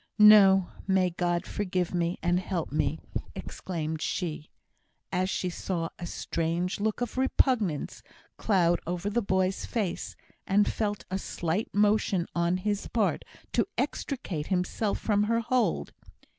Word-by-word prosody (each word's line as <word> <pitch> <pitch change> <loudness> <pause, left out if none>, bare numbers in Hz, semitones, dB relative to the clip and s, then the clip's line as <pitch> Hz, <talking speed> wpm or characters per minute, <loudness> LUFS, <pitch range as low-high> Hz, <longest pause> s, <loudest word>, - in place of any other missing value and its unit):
"No! 200 -3 +8 0.2
May 190 -2 +3
God 175 0 -1
forgive 185 -3 -2
me, 175 0 0
and 175 +1 +2
help 185 -3 -3
me!" 150 - 0 0.4
exclaimed 160 -3 -4
she, 160 -4 -3 0.6
as 185 0 0
she 185 - -1
saw 170 -2 -3
a 175 - -5
strange 170 +3 -2
look 215 +2 -1
of 245 +1 -2
repugnance 235 - +1 0.3
cloud 175 -5 +2
over 180 +4 -2
the 240 +3 +1
boy's 190 -2 0
face, 190 -6 -2 0.3
and 205 +2 +4
felt 205 -2 -2
a 190 - -1
slight 175 +3 -2
motion 205 -3 +2
on 170 +1 +1
his 205 +2 -2
part 220 -4 0 0.3
to - - +2
extricate 180 - -2
himself 190 +3 0
from 210 -1 +1
her 230 +2 +1
hold. 245 +1 0
190 Hz, 135 wpm, -28 LUFS, 175-210 Hz, 0.6 s, No